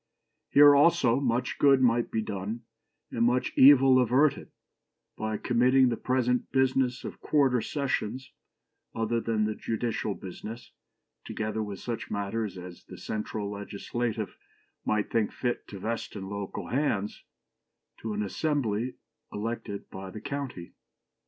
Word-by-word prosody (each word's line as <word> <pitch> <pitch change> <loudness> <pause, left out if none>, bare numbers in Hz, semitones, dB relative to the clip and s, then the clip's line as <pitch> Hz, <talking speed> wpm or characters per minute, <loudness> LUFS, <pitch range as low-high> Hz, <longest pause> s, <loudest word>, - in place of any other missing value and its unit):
Here, 145 0 +8
also, 140 -5 +4
much 125 -2 -1
good 140 -2 +6
might 120 -2 +3
be 110 - -1
done, 105 +3 -4 0.5
and 115 - 0
much 125 +2 +1
evil 135 -1 +7
averted, 130 +4 +2 0.7
by 110 0 -2
committing 125 +3 +4
the 120 - 0
present 125 0 0
business 130 -1 +1
of - - -7
quarter 135 -5 +2
sessions, 130 -1 -2 0.6
other 115 +1 0
than 110 -2 0
the 110 - -1
judicial 110 -2 -2
business, 110 +5 -9 0.5
together 110 0 -3
with 105 -2 -5
such 120 -2 -4
other - - -7
matters 100 -1 -2
as 90 -1 -10
the - - -11
central 105 -1 -4
legislative 105 +2 -4 0.5
might 105 -1 0
think 110 -2 +1
fit 120 -1 -3
to 100 - -8
vest 110 +4 -4
in 95 -2 -6
local 100 -1 -5
hands, 115 -7 -1 0.8
to 110 -1 -4
an 105 0 -1
assembly 125 -1 -1 0.4
elected 110 -1 -4
by 95 0 -7
the 110 - -8
county." 140 -11 -5
115 Hz, 135 wpm, -28 LUFS, 105-130 Hz, 0.8 s, Here